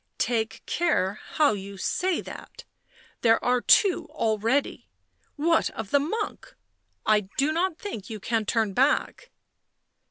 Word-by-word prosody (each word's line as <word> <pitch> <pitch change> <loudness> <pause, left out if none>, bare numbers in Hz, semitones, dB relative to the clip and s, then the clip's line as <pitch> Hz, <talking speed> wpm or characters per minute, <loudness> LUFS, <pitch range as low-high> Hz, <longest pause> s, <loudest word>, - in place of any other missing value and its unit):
" - - -51
Take 225 -2 -1
care 215 - 0
how 300 -5 +4
you 200 0 -7
say 365 - 0
that. - - -10 0.6
There 225 -1 +5
are 250 0 +2
two 390 - +4
already 230 -1 -1 0.2
— - - -42
what 325 +2 +2
of 220 -3 -6
the 285 - +5
monk? 415 +10 -4 0.5
I 210 -3 +2
do 280 +3 +2
not 340 +1 0
think 220 - -7
you 220 -2 -6
can 220 +1 -1
turn 220 -3 +1
back." 290 - +1
245 Hz, 145 wpm, -26 LUFS, 215-315 Hz, 0.6 s, There